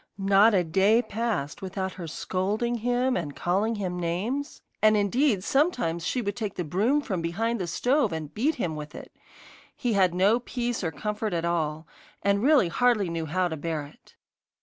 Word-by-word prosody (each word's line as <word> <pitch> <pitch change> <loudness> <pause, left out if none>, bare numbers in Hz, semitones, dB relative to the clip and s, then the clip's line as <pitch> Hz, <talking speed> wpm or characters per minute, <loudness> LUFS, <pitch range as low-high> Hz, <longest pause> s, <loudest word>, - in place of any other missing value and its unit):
Not 200 +2 +5
a 180 - +3
day 195 +8 +3
passed 220 - -3
without 190 0 -3
her 175 -3 -8
scolding 205 +9 -1
him 245 +3 +1
and 150 -5 -3
calling 200 +6 0
him 185 -4 -3
names, 210 - -3 0.2
and 215 0 +5
indeed 210 +1 +2
sometimes 240 - +1
she 250 - -1
would 205 -1 -2
take 210 -3 -4
the 180 - -2
broom 210 - +1
from 190 -11 -3
behind 215 +7 -1
the 180 - -2
stove 245 - +1
and 160 -2 -5
beat 290 +8 +1
him 170 -9 -2
with 150 0 -8
it. - - -11 0.6
He 245 -3 -1
had 185 -3 +3
no 200 +6 +4
peace 240 -2 -3
or 165 - 0
comfort 210 +3 -3
at 165 0 -1
all, 160 -2 -1 0.4
and 200 0 +2
really 270 - +5
hardly 215 -3 +2
knew 165 -1 -3
how 180 +4 +1
to 160 - -4
bear 155 -1 -3
it. 145 - -19
200 Hz, 185 wpm, -26 LUFS, 170-235 Hz, 0.6 s, Not